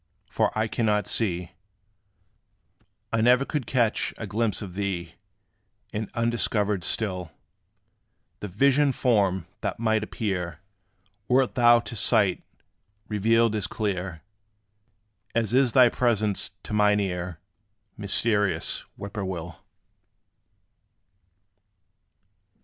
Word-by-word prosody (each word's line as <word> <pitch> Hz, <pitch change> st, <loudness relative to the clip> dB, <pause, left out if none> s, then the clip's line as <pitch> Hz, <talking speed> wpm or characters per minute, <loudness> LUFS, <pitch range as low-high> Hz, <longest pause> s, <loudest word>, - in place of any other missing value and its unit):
for 110 Hz, -2 st, +1 dB
I 110 Hz, 0 st, +1 dB
cannot 105 Hz, -2 st, 0 dB
see 90 Hz, -6 st, 0 dB, 1.6 s
I 115 Hz, -, +2 dB
ne'er 125 Hz, +4 st, +4 dB
could 145 Hz, -6 st, -3 dB
catch 120 Hz, -4 st, +1 dB
a 110 Hz, -, -5 dB
glimpse 110 Hz, +1 st, -1 dB
of 95 Hz, -3 st, -8 dB
thee; 95 Hz, -3 st, -3 dB, 0.8 s
And 105 Hz, 0 st, -3 dB
undiscovered 110 Hz, -4 st, 0 dB
still 90 Hz, -5 st, -1 dB, 1.1 s
The 105 Hz, -, -5 dB
vision 140 Hz, +8 st, +3 dB
form, 100 Hz, -9 st, +1 dB
that -, -, -3 dB
might 110 Hz, -1 st, +1 dB
appear, 90 Hz, -7 st, -3 dB, 0.7 s
Wert 130 Hz, 0 st, +2 dB
thou 120 Hz, -1 st, +5 dB
to 115 Hz, 0 st, -8 dB
sight 105 Hz, -4 st, +2 dB, 0.7 s
revealed 115 Hz, +2 st, +2 dB
as 105 Hz, -3 st, -2 dB
clear, 95 Hz, -5 st, -3 dB, 1.1 s
As 115 Hz, -1 st, 0 dB
is 130 Hz, -2 st, +3 dB
thy 125 Hz, -2 st, +7 dB
presence 110 Hz, -4 st, 0 dB
to -, -, -6 dB
mine 105 Hz, 0 st, +3 dB
ear, 90 Hz, -3 st, -3 dB, 0.6 s
Mysterious 105 Hz, 0 st, +1 dB
Whip 100 Hz, 0 st, -8 dB
poor 105 Hz, -, -3 dB
will. 85 Hz, -3 st, -5 dB
105 Hz, 105 wpm, -26 LUFS, 95-115 Hz, 1.6 s, thy